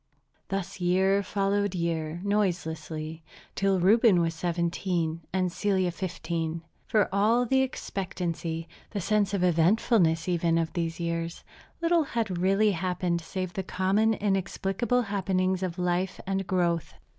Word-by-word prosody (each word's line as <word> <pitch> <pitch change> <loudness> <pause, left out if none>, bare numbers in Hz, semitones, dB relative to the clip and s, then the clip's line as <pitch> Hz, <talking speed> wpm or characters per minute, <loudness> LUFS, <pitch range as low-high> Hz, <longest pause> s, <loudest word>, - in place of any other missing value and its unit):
Thus 195 -1 -3
year 190 +3 +3
followed 200 0 0
year 165 -1 -2
noiselessly, 165 -5 -2 0.3
till 195 -1 +1
Reuben 210 +1 +5
was 165 -1 +1
seventeen 170 -1 -1
and 185 -1 0
Celia 190 -1 +1
fifteen. 170 -2 -3 0.2
For 215 -2 +3
all 220 +5 +3
the 265 +2 +3
expectancy, 170 -9 -3 0.2
the 205 - -3
sense 205 +1 +1
of 200 -3 0
eventfulness 175 0 +3
even, 170 -2 +2
of 165 -1 -1
these 165 -1 -2
years, 170 0 -3 0.4
little 335 0 +3
had 220 -9 -2
really 195 +3 +3
happened 180 -1 -1
save 185 +2 -4
the 190 - -2
common 195 +4 +1
inexplicable 200 +4 0
happenings 190 -2 0
of 180 -2 -3
life 180 +1 -1
and 195 0 -2
growth. 170 -3 0
185 Hz, 130 wpm, -28 LUFS, 170-200 Hz, 0.4 s, Reuben